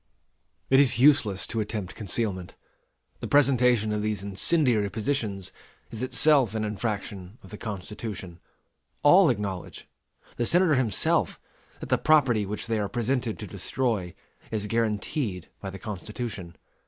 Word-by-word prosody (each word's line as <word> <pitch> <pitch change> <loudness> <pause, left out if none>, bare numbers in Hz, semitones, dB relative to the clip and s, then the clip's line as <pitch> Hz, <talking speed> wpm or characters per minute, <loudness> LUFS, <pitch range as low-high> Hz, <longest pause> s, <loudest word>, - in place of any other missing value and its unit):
It 135 - +7
is 130 -5 +4
useless 120 -8 +4
to 115 - -3
attempt 105 -3 -4
concealment. 100 -3 -3 0.6
The - - -5
presentation 125 -6 +3
of 105 - -1
these 105 -2 -2
incendiary 105 - +2
petitions 110 -5 -2 0.4
is 110 - -6
itself 130 -2 +3
an 110 - -1
infraction 105 -2 -4
of 95 - -14
the 105 - -7
Constitution. 100 -3 -6 0.6
All 175 +3 +7
acknowledge 100 -6 -4 0.5
the 120 - 0
Senator 175 -2 +4
himself 125 -7 +1 0.4
that - - -7
the - - +2
property 130 -10 +3
which 105 +2 -4
they 115 -2 -1
are 100 -1 -2
presented 120 0 -1
to 105 - -7
destroy 100 -1 -2 0.3
is 105 -2 -2
guaranteed 105 - -2
by 95 - -6
the 95 - -8
Constitution. 105 -3 -6
110 Hz, 135 wpm, -26 LUFS, 100-125 Hz, 0.6 s, It